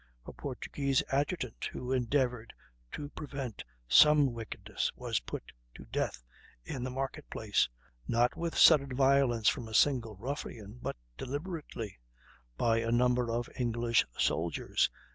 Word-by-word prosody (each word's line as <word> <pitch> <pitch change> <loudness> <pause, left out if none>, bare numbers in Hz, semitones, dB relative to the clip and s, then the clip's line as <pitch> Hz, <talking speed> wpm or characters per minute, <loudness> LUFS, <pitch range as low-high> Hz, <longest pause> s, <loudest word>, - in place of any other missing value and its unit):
a - - -8
Portuguese 140 -2 -1
adjutant, 140 -2 -1
who 125 - -4
endeavored 125 -2 0 0.4
to 145 -1 -5
prevent 140 -7 -6 0.2
some 150 - +6
wickedness, 115 -2 -3
was - - -1
put - - -7 0.2
to - - -11
death - - -2 0.4
in 125 - -4
the 130 - -2
market 135 +1 -4
place, 105 - +1 0.4
not 120 +1 +2
with 170 -1 -3
sudden 140 -5 +6
violence 135 -4 +3
from 115 - +2
a 110 - -5
single 120 -5 +3
ruffian, 115 -1 -6
but - - -3 0.2
deliberately, 145 - -5 0.6
by 115 -1 +3
a 115 0 -1
number 125 0 +2
of 120 +1 -1
English 120 -1 +2
soldiers.... 85 0 +1
125 Hz, 130 wpm, -32 LUFS, 115-140 Hz, 0.6 s, some